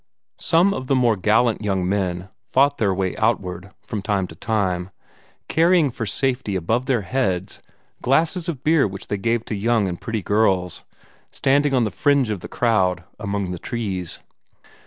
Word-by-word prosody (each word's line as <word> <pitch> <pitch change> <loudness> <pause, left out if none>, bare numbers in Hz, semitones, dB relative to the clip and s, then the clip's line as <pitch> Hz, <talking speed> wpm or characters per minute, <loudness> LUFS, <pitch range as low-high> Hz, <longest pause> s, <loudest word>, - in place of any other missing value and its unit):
Some 175 +4 +4
of 130 -6 -5
the 135 - +2
more 120 -3 +3
gallant 110 +4 +2
young 95 -4 0
men 95 -2 -1 0.2
fought 140 +2 +3
their 105 -4 +2
way 95 -1 -1
outward, 100 -4 -1
from 105 - -4
time 95 -1 0
to 80 - -11
time, 95 -3 -1 0.6
carrying 165 -3 +3
for 115 -2 -4
safety 125 -3 -1
above 110 +8 0
their 125 -5 +2
heads 95 -7 -2 0.4
glasses 160 +6 +1
of 140 -5 -5
beer 155 -5 +4
which 95 0 -8
they 105 - -1
gave 115 +3 0
to - - -4
young 110 0 +1
and 90 -2 -5
pretty 110 -3 -3
girls 95 -4 +1 0.5
standing 140 +1 +2
on 125 - +3
the 105 - -1
fringe 140 +4 +2
of 105 - -3
the - - -8
crowd, 95 -7 +1 0.2
among 100 -3 -2
the 90 - -5
trees. 95 -7 -4
110 Hz, 170 wpm, -22 LUFS, 95-130 Hz, 0.6 s, Some